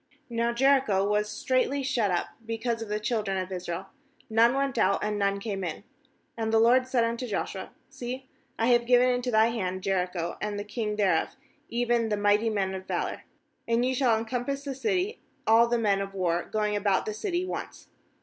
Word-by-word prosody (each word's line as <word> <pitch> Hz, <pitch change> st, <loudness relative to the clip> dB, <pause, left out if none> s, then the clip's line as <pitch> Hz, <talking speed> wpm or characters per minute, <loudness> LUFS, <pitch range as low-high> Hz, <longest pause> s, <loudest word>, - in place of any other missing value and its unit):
£* -, -, -44 dB, 0.3 s
Now 235 Hz, 0 st, +1 dB
Jericho 240 Hz, -6 st, +3 dB
was 210 Hz, 0 st, +1 dB
straitly 260 Hz, +5 st, 0 dB
shut 235 Hz, -5 st, +1 dB
up 175 Hz, -, 0 dB
because 230 Hz, +1 st, -2 dB
of 225 Hz, -, -6 dB
the 210 Hz, 0 st, -1 dB
children 210 Hz, -3 st, -1 dB
of 185 Hz, 0 st, -3 dB
Israel: 180 Hz, +1 st, -5 dB, 0.4 s
none 230 Hz, +3 st, +5 dB
went 275 Hz, -3 st, 0 dB
out, 195 Hz, -1 st, +2 dB
and 210 Hz, 0 st, -1 dB
none 200 Hz, 0 st, +1 dB
came 200 Hz, -2 st, -4 dB
in. 170 Hz, +2 st, -4 dB, 0.3 s
— -, -, -43 dB
2And 220 Hz, -1 st, 0 dB
the 225 Hz, 0 st, +4 dB
LORD 250 Hz, +3 st, +5 dB
said 255 Hz, -2 st, +2 dB
unto 235 Hz, +2 st, -2 dB
Joshua: 195 Hz, -2 st, -3 dB, 0.2 s
'See, 255 Hz, +2 st, -6 dB, 0.3 s
I 225 Hz, -, +1 dB
have 240 Hz, -1 st, +3 dB
given 250 Hz, 0 st, +5 dB
into 250 Hz, 0 st, -1 dB
thy 220 Hz, -1 st, +4 dB
hand 185 Hz, -5 st, -3 dB
Jericho, 180 Hz, -3 st, -1 dB
and 210 Hz, -1 st, -2 dB
the 205 Hz, -, -3 dB
king 210 Hz, 0 st, -3 dB
thereof, 205 Hz, -3 st, +1 dB, 0.3 s
even 235 Hz, -1 st, +1 dB
the 210 Hz, -, 0 dB
mighty 205 Hz, +2 st, +3 dB
men 195 Hz, -3 st, -1 dB
of 190 Hz, 0 st, -7 dB
valour. -, -, -3 dB, 0.4 s
3And 230 Hz, +1 st, +3 dB
ye 260 Hz, -, +1 dB
shall 235 Hz, -4 st, +2 dB
compass 260 Hz, +4 st, -3 dB
the 280 Hz, -1 st, -4 dB
city, 375 Hz, -, -1 dB, 0.3 s
all 225 Hz, +2 st, +6 dB
the 240 Hz, 0 st, +1 dB
men 205 Hz, -3 st, +2 dB
of 195 Hz, 0 st, -6 dB
war, 175 Hz, -2 st, 0 dB
going 210 Hz, -1 st, 0 dB
about 200 Hz, -2 st, +1 dB
the 215 Hz, -, -3 dB
city 355 Hz, -, -2 dB
once. -, -, -6 dB
225 Hz, 200 wpm, -27 LUFS, 200-245 Hz, 0.4 s, all